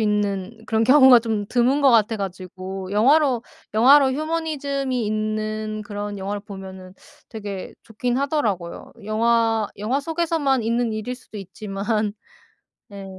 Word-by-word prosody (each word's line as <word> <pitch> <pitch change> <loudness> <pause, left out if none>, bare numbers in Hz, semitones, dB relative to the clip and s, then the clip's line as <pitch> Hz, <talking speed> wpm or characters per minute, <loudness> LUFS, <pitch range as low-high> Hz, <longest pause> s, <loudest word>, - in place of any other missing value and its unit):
있는 205 -1 -1
그런 220 0 +1
경우가 260 0 +8
좀 220 -3 -2
드문 255 +4 +2
것 270 - +6
같아 225 -1 +3
가지고 185 0 -6
영화로 260 +3 +3 0.3
영화로 265 +4 +6
휴머니즘이 280 -5 -2
있는 215 0 -2
그런 205 -1 -5
영화를 200 +2 -4
보면은 190 -2 -10 0.4
되게 205 -3 -6
좋긴 240 +3 -2
하더라고요. 225 - -2
영화 225 0 +2
영화 230 +7 0
속에서만 320 -4 0
있는 230 0 0
일일 215 +3 -4
수도 235 -4 -12
있지만. 205 +2 -3 0.8
네. 200 -1 -9
220 Hz, 290 characters per minute, -22 LUFS, 205-260 Hz, 0.8 s, 경우가